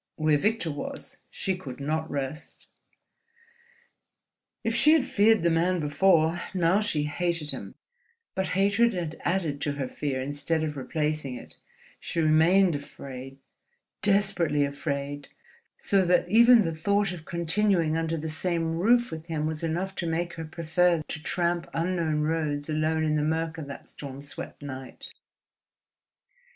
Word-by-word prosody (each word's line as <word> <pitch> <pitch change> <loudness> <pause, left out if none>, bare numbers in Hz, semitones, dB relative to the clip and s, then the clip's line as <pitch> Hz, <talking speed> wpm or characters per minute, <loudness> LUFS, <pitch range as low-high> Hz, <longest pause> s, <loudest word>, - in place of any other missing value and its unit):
Where 155 -1 +2
Victor 210 -3 0
was, 145 - -6
she 190 - -2
could 140 -9 -8
not 155 +3 -2
rest. 140 +2 -5 2.0
If 225 - 0
she 270 +7 +6
had 310 -5 +3
feared 215 -3 +3
the 170 - +3
man 175 +2 +2
before, 160 +2 +3
now 180 +2 +3
she 160 -8 0
hated 165 0 -1
him; - - -8 0.6
but 190 0 -1
hatred 205 +4 +3
had 170 -4 -4
added 170 -6 -1
to 145 - -1
her 140 -2 -3
fear 135 0 -3
instead 145 +4 -1
of 150 -1 -3
replacing 150 -1 -2
it, - - -9 0.4
she 170 - -4
remained 165 +3 +4
afraid, 135 -2 -8 0.6
desperately 195 -8 +3
afraid, 140 0 -4 0.5
so 195 -1 +2
that 180 0 +3
even 235 +3 +7
the 165 -2 -2
thought 200 +4 +1
of 175 -3 -8
continuing 170 -1 +1
under 165 0 -1
the 160 +1 -4
same 165 +1 -1
roof 240 +4 +3
with 160 0 -7
him 155 -2 -2
was 155 0 -2
enough 175 +4 -2
to 170 - -2
make 170 +1 -1
her 160 - -6
prefer 165 +1 +1
to 150 - -5
tramp 170 +1 -1
unknown 165 -3 0
roads 150 -2 -1
alone 155 +1 +1
in 155 -1 +1
the - - +1
mirk 160 +2 -1
of 150 - -6
that 140 - -9
storm 140 -2 -8
swept 140 +1 -8
night. 130 -2 -8
160 Hz, 150 wpm, -27 LUFS, 150-180 Hz, 2.0 s, even